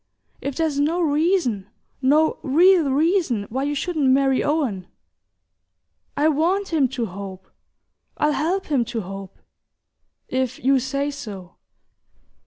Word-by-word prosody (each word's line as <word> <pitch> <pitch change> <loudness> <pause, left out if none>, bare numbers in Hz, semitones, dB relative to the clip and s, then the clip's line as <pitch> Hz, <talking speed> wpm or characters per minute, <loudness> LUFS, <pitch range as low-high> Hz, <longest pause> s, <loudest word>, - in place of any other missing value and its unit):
If 280 -1 -4
there's 315 -3 0
no 315 +5 +1
reason, 300 - +1 0.3
no 300 +4 +3
real 330 +2 +4
reason, 305 - +1
why 265 +3 -1
you 290 0 -1
shouldn't 300 -2 0
marry 270 0 +3
Owen, 260 - -1 1.3
I 295 - +3
WANT 345 +7 +1
him 290 -5 +3
to 235 - 0
hope, 190 -1 -9 0.7
I'll 300 - +2
help 345 +7 -1
him 275 -5 +1
to 230 -1 -4
hope... 195 0 -9 0.9
if 260 -1 -2
you 270 0 +4
say 275 +3 -2
so...." 205 -11 -9
280 Hz, 125 wpm, -22 LUFS, 240-315 Hz, 1.3 s, real